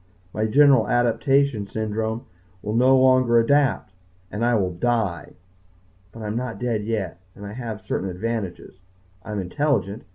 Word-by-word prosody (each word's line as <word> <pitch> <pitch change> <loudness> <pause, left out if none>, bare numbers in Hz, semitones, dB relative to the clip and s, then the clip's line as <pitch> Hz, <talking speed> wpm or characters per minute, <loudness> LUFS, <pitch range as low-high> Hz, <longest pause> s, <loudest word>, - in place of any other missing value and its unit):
My 110 0 0
general 135 -1 +5
adaptation 120 -1 +1
syndrome 110 +3 -3 0.4
will 105 - -3
no 130 +3 +5
longer 130 -2 +4
adapt. 130 -4 +2 0.4
And 105 +3 -3
I 120 0 +3
will 95 -4 0
die. 100 -5 -1 0.8
But 115 - -10
I - - -5
am 105 +1 -3
not 125 -1 -3
dead 115 -4 -2
yet. 100 -6 -3 0.2
And 100 - -10
I 100 - -7
have 110 -4 -6
certain 95 0 -3
advantages. 95 -1 -5 0.4
I 105 - -9
am 105 - -2
intelligent. 110 +1 -1
115 Hz, 155 wpm, -23 LUFS, 105-125 Hz, 0.8 s, general